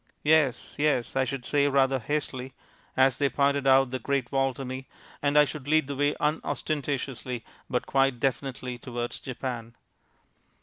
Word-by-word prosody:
"Yes, 150 -5 +2
yes," 145 -5 +1
I 135 0 +3
should 130 -1 -4
say 145 -1 +3
rather 135 -1 +3
hastily, 130 0 -3 0.4
as 130 -1 +4
they 140 -1 +3
pointed 140 0 +1
out 135 -1 +5
the 130 - -2
Great 135 0 -1
Wall 135 -1 +2
to 135 - -6
me, 130 +1 -6 0.3
and 145 +1 +2
I 150 - +8
should 145 0 -7
lead 155 0 +4
the 140 +1 -4
way 145 +2 +1
unostentatiously 140 -5 -2 0.2
but 125 - 0
quite 135 -2 +2
definitely 130 -1 -2
towards 120 -1 -4
Japan. 120 -3 -5
135 Hz, 160 wpm, -27 LUFS, 125-145 Hz, 0.4 s, I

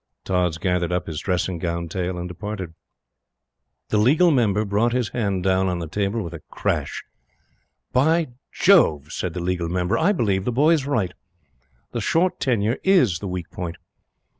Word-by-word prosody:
Tods 90 -3 0
gathered 90 0 0
up 90 0 -1
his 80 -3 -4
dressing 90 -1 -1
gown 85 0 -2
tail 90 +1 -3
and 90 0 -4
departed. 95 -1 -6 1.2
The 105 - +2
Legal 150 +10 +5
Member 110 -6 +2
brought 105 +4 +1
his 125 -5 0
hand 100 -6 -1
down 95 0 +2
on 90 -1 -1
the 85 -2 -4
table 100 +5 -1
with 85 -1 -7
a 85 - -8
crash - - -2 0.9
"By 160 +4 +3 0.2
Jove!" 80 - +4
said 90 -2 -3
the - - -2
Legal 90 -2 -1
Member, 90 +1 0
"I 205 - +3
believe 100 - +1
the 125 - -1
boy 145 +7 +4
is 150 -5 +2
right. 105 -11 0 0.8
The 120 - -3
short 175 - +1
tenure 115 -2 +1
IS 150 - +4
the 100 - -5
weak 90 -2 -5
point." 85 -2 -5
95 Hz, 170 wpm, -23 LUFS, 90-120 Hz, 1.2 s, Legal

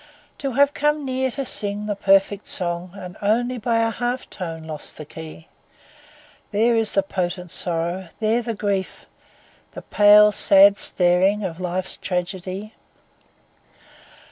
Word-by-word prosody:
To 275 -3 -3
have 285 +3 +3
come 295 0 0
near 260 0 -1
to 275 +2 -4
sing 205 -2 -3
the 210 -1 -2
perfect 195 +1 +2
song 175 -1 -3
And 180 -2 -9
only 240 +4 0
by 230 0 +1
a 225 0 +1
half 245 +3 -3
tone 165 -4 -6
lost 155 -2 -8
the 155 - -8
key, 160 +1 -11 1.0
There 225 +3 +2
is 225 -2 0
the 195 - +2
potent 180 -2 -4
sorrow, 175 +2 -1
there 225 +2 +1
the 230 -1 -4
grief, 200 -2 -3 0.7
The - - -9
pale, 210 0 +6
sad 200 0 +6
staring 185 +3 +2
of 175 -3 -5
life's 180 +1 -1
tragedy. 185 +3 -4
200 Hz, 140 wpm, -22 LUFS, 180-225 Hz, 1.0 s, pale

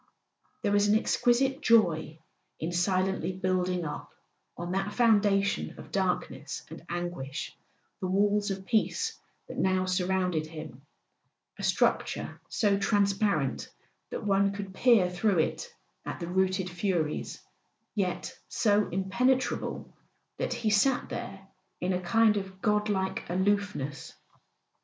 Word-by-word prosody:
There 205 - +1
was 205 0 +4
an 210 +1 +5
exquisite 265 +4 +2
joy 175 - +3 0.4
in 160 +2 -2
silently 185 +1 +1
building 185 -1 0
up, 150 - -5 0.5
on 175 +1 -4
that 195 +2 -1
founda¬ 210 -4 +4
tion 200 - -2
of - - -11
darkness 180 -6 -2
and 160 - -9
anguish, 170 -5 -4 0.4
the 190 - -2
walls 205 +2 +2
of 190 -1 -4
peace 450 - 0 0.3
that - - -6
now 185 0 +2
surrounded 180 -3 0
him, 155 -5 -9 0.8
a - - -5
structure - - 0
so 200 -2 +2
transparent 200 - +1 0.4
that - - -5
one 200 -1 +2
could 200 -1 -6
peer 220 -3 +5
through 180 +2 +1
it 160 - -1 0.3
at - - -5
the 170 - -3
routed 185 +1 +1
Furies, 175 -4 -2 0.5
yet 185 -4 -2
so 210 -2 +2
impenetrable 240 +8 0 0.4
that - - -1
he 220 -2 0
sat 250 +6 +3
there 195 0 -6 0.3
in 180 +1 0
a 180 - -1
kind 215 +4 +4
of 190 -1 -5
god 210 0 +1
like 190 -2 -1
aloofness. 190 -6 -1
190 Hz, 130 wpm, -29 LUFS, 180-205 Hz, 0.8 s, an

